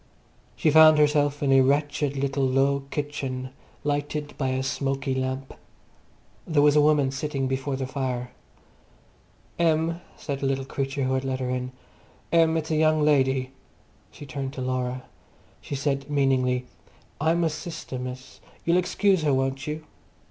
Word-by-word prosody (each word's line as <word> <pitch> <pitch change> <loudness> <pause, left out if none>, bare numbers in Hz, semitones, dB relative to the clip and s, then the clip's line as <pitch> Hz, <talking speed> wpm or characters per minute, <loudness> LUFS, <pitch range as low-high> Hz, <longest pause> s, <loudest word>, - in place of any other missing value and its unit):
She 155 - +2
found 155 0 +8
herself 145 -1 +2
in 135 - +2
a 135 - +7
wretched 145 +1 +1
little 135 0 0
low 135 +1 +2
kitchen, 135 -3 -4 0.3
lighted 145 +1 -2
by 135 -2 -1
a 130 0 -1
smoky 135 0 -1
lamp. 130 +1 -3 0.9
There 155 -4 +3
was 145 0 +5
a 150 - +6
woman 145 -3 +3
sitting 135 -1 -2
before 135 +1 -2
the 130 0 -3
fire. 130 -2 -3 1.3
"Em," 165 +1 +1 0.2
said 140 -3 -4
the 135 - -1
little 135 0 -1
creature 135 0 -3
who 130 0 0
had 130 0 0
let 130 -1 -2
her 125 -1 -2
in. 125 0 -3 0.6
"Em! 165 -1 +4
It's 160 0 -3
a - - +2
young 155 -1 +3
lady." 135 -3 +2 0.6
She 145 - -11
turned 135 0 -5
to 130 - -6
Laura. 130 0 -2 0.6
She 140 - -5
said 140 0 -2
meaningly, 130 -3 +1 0.5
"I'm 165 +3 +2
'er - - +2
sister, 155 -4 -6
miss. 130 0 -8 0.3
You'll 170 +1 +3
excuse 185 0 +2
'er, 145 -3 +3
won't 135 +1 -1
you?" 155 +1 -4
140 Hz, 155 wpm, -25 LUFS, 130-150 Hz, 1.3 s, found